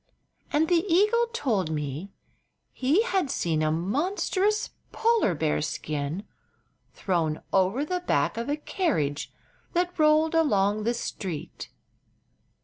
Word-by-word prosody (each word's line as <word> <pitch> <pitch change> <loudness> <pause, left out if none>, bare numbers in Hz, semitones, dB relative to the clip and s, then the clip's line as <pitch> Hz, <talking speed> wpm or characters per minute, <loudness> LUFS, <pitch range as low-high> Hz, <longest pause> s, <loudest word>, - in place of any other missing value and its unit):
And 310 +2 +2
the 345 -1 +3
eagle 425 +7 +4
told 220 - 0
me 150 +4 -4 0.6
he 290 - +2
had 380 - 0
seen 165 - 0
a 155 0 +2
monstrous 370 - 0 0.2
polar 455 - +2
bear 150 0 0
skin 150 +3 -3 0.7
thrown 165 -5 -1
over 195 +9 +2
the 360 +3 -1
back 360 - 0
of 230 +3 -4
a 290 - 0
carriage 160 - -1 0.4
that 355 0 -1
rolled 310 +1 +4
along 210 -10 +2
the 235 +1 +1
street. 185 -8 -5
250 Hz, 120 wpm, -27 LUFS, -, 0.7 s, eagle